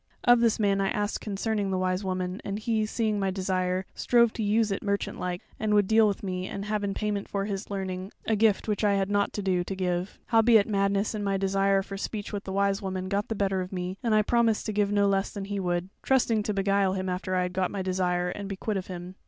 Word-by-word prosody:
Of 245 -1 +6
this 230 -2 +2
man 200 -2 +2
I 195 - +1
asked 205 0 -2
concerning 205 0 -1
the 190 - 0
Wise 185 +1 0
Woman, 185 0 -3
and 200 0 -3
he 220 0 0
seeing 215 -2 0
my 195 -1 +1
desire, 185 -1 -1
strove 235 -2 +3
to - - -4
use 215 +1 +2
it 195 - -2
merchant 200 -1 -2
like, 180 0 -3 0.2
and 210 -1 +1
would 205 -2 +4
deal 220 0 +5
with 200 -1 -2
me 185 -1 -3
and 200 0 -5
have 210 0 -1
in 195 -1 -2
payment 210 -2 -2
for 200 -1 -1
his 200 0 -4
learning 190 -1 -4
a 220 - +2
gift 215 -1 +2
which 210 0 -1
I 205 -1 +4
had 195 0 0
nought 205 0 +2
to 205 - -3
do 185 -2 +1
to 195 - -5
give. 180 0 -2
Howbeit 225 -2 +5
madness 200 0 +1
and 210 -1 -3
my 195 -1 +1
desire 195 0 +2
for 195 0 -7
speech 205 +1 -5
with 205 0 -4
the 190 - -5
Wise 200 +1 +1
Woman 185 -1 -3
got 200 +1 0
the 225 - -3
better 195 -2 0
of 180 - -6
me, 180 0 -3
and 225 -2 +2
I 215 - +4
promised 230 -1 +2
to 215 - -2
give 205 -1 +1
no 205 -1 +3
less 195 0 +1
than 200 -2 -6
he 200 0 -3
would, 175 -1 -1
trusting 240 -5 +2
to 210 0 -2
beguile 195 -1 +2
him 190 0 -2
after 185 +1 -2
I 180 - +2
had 180 0 -3
got 185 -1 0
my 195 -2 -3
desire, 180 -1 0
and 200 +2 -5
be 195 - -3
quit 210 +2 -2
of 185 - -5
him. 180 0 -7
200 Hz, 260 wpm, -27 LUFS, 185-210 Hz, 0.2 s, Of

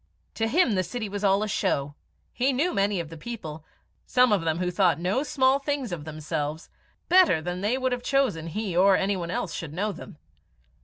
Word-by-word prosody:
To 225 - -1
him 295 +1 +3
the 190 -3 +2
city 215 +5 -4
was 205 +1 -5
all 200 +1 +3
a - - -2
show. 145 -7 -1 0.4
He 260 +3 +1
knew 300 +8 0
many 200 -1 +1
of 165 -3 -5
the 165 - -9
people 160 -6 -7 0.4
some 250 -2 +4
of 205 -4 +3
them 160 -1 0
who 180 0 -1
thought 180 -4 +2
no 185 +9 0
small 270 -2 +2
things 280 -5 -3
of 160 -4 -5
themselves 155 0 -4 0.4
better 360 - +5
than 175 +3 -4
they 215 +6 +1
would 260 -1 0
have 245 0 -2
chosen 250 - 0
he 195 +1 -3
or 190 +2 +5
any 195 +1 0
one 170 -2 -4
else - - -3
should 155 -3 -6
know 205 +4 -1
them. 170 - -11
195 Hz, 210 wpm, -26 LUFS, 165-245 Hz, 0.4 s, better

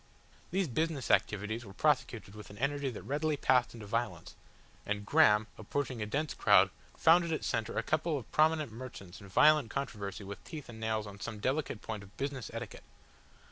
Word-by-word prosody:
These 190 0 0
business 150 +1 -1
activities 110 +3 +1
were 100 -3 -12
prosecuted 130 -8 +1
with 105 0 -10
an 100 - -11
energy 140 +2 0
that 120 - -7
readily 145 +5 0
passed 125 -3 +3
into 110 -2 -9
violence, 105 -5 -3 0.5
and 105 0 -3
Graham 105 +1 +5
approaching 125 +2 -3
a 105 - -2
dense 145 +7 -1
crowd - - +5 0.3
found 170 +2 +6
at 170 - -3
its 160 - -2
centre 115 -1 -1
a - - +1
couple 155 0 0
of 125 - -9
prominent 155 -3 +3
merchants 110 -6 -9
in 100 - -11
violent 150 +5 +5
controversy 105 -7 -4
with 100 +1 -8
teeth 150 -5 -8
and 110 -1 -9
nails 110 -1 -1
on 100 -1 -10
some 110 +2 -5
delicate 130 +1 -2
point 110 -2 -4
of 100 0 -15
business 135 -3 -3
etiquette. 115 -1 -7
115 Hz, 185 wpm, -32 LUFS, 105-145 Hz, 0.5 s, found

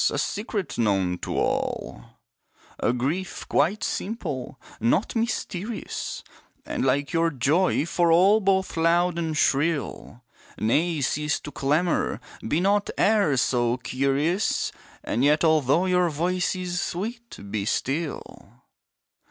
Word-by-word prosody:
a - - -3
secret 205 - -3
known 95 -5 +2
to - - -4
all, - - -2 0.8
A - - +2
grief, 145 +10 -3
quite 175 +9 +1
simple, 155 - -4 0.2
nought 120 - +1
mysterious, 225 -2 -3 0.4
And - - -2
like 140 +3 +1
your 165 0 +3
joy 150 +4 +1
for 170 0 +2
all, 190 +6 +6
both 190 -2 +1
loud 170 +1 +2
and 160 -2 -2
shrill, 140 -5 0 0.3
Nay 155 +8 +1
cease 150 +3 0
to 145 - -8
clamour, 150 +6 0 0.3
be 150 +8 +1
not 200 +2 +2
e'er 200 -10 +3
so 120 -1 +1
curious! 140 +10 0 0.3
And 120 - -1
yet 150 +3 +4
although 160 +1 +3
your 180 -1 +2
voice 180 +5 0
is 180 -1 -3
sweet, 230 +8 -5
be 105 -2 -2
still! 145 +7 -3
165 Hz, 120 wpm, -25 LUFS, 135-185 Hz, 0.8 s, all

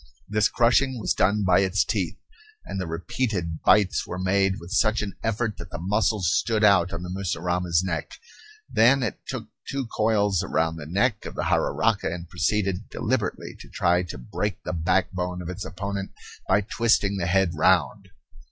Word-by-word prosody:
This 105 +1 +2
crushing 125 +2 +2
was 105 - 0
done 105 +2 +2
by 95 -2 +4
its 95 0 +2
teeth; 95 -3 -2 0.5
and 95 - -4
the 90 - -4
repeated 85 0 -3
bites 105 -3 +3
were 90 - -5
made 95 +1 +1
with 85 +2 -11
such 110 0 +2 0.2
effort 115 -1 -1
that 85 - -8
the 85 - -6
muscles 95 0 +1
stood 110 -2 +1
out 95 -3 +5
on 85 0 -5
the 90 - -6
mussurama's 90 -2 0
neck. 85 -3 -3 0.5
Then 130 +4 +4
it 110 - -3
took - - -5 0.2
two 135 -1 -2
coils 105 -4 +2
round 80 -3 -1
the 75 - -8
neck 100 +6 0
of - - -8
the - - -2
jararaca - - +1
and 85 0 -6
proceeded 100 +2 -1
deliberately - - -2
to - - -12
try 90 +1 +2
to 90 -4 -7
break 90 +9 -4
the - - -4
backbone 90 +1 0
of 90 -1 -6
its 90 +2 -5
opponent 100 0 -5 0.3
by 95 +2 +3
twisting 105 -2 +1
the 85 -3 -1
head 95 0 +2
round. 95 +4 +2
95 Hz, 170 wpm, -25 LUFS, 90-105 Hz, 0.5 s, out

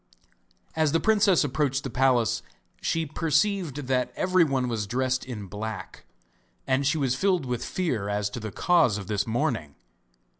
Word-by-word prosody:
As 155 -2 +2
the 165 - +3
princess 205 -5 +4
approached 140 0 0
the 135 - -5
palace 125 -4 +2 0.4
she 165 0 0
perceived 155 0 0
that 125 -1 0
everyone 160 -9 +2
was 110 -4 -2
dressed 130 +3 0
in 115 -6 -6
black, 105 0 -7 0.6
and 135 +1 +1
she 150 - +2
was 135 -4 +1
filled 185 0 +1
with 125 -2 -3
fear 125 - -2
as 105 0 0
to 120 - -5
the 110 -1 -6
cause 150 - +3
of 100 - -6
this 100 +1 -1
mourning. 110 - -1
130 Hz, 155 wpm, -26 LUFS, 110-160 Hz, 0.6 s, princess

